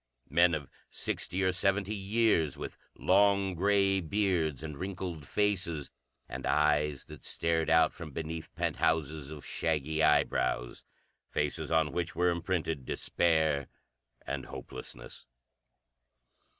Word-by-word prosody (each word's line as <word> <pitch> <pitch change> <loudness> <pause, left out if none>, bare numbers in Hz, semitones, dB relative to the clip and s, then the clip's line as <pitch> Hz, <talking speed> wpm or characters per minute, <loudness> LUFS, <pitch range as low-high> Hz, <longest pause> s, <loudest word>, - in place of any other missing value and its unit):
Men 85 -1 +5
of 75 -3 -5 0.2
sixty 95 +2 0
or 95 - +3
seventy, 100 +2 +1
years, 100 - +1
with - - -6 0.2
long, 100 0 +3
gray 100 +1 +3
beards 85 -5 0
and 75 -2 -5
wrinkled 90 -4 -5
faces, 90 -8 0 0.4
and - - -6
eyes 75 -2 +2
that - - -12
stared 80 -1 0
out 80 0 +5
from 85 -3 -8
beneath 80 +2 -5
penthouses 80 -3 0
of 75 -2 -8
shaggy 80 0 -1
eyebrows. 60 -4 +2 0.5
Faces 75 -1 -1
on 80 -2 +3
which 85 +4 -2
were 90 +1 +3
imprinted 85 -4 -2
despair 80 0 +1 0.6
and - - -4
hopelessness. - - -8
80 Hz, 115 wpm, -31 LUFS, 75-95 Hz, 0.6 s, Men